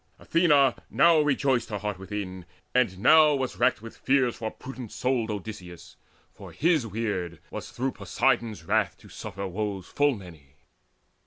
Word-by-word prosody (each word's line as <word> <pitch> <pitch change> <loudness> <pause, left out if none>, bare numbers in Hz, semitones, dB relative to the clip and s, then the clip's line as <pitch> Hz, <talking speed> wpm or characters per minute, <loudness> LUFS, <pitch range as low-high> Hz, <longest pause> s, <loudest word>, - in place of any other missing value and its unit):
Athena 145 -6 +3
now 170 -2 +5
rejoiced 135 -4 +1
Her 105 - -3
heart 105 -2 -4
within, 95 -2 -6 0.3
and 120 -8 +2
now 150 +7 +6
was 130 -2 -3
racked 120 -3 +2
with 115 - -9
fears 130 -3 +1
For 110 -1 -4
prudent 130 -1 -9
souled 125 -3 -1
Odysseus; 100 -4 -7 0.4
for - - -11
his 155 -6 +1
weird 100 -6 -3
Was - - -6
through 130 +2 -2
Poseidon's 115 -10 0
wrath - - 0
to - - -17
suffer 100 +2 -6
woes 100 0 -4
Full 145 -2 +1
many. 80 -9 -13
115 Hz, 150 wpm, -27 LUFS, 100-135 Hz, 0.4 s, now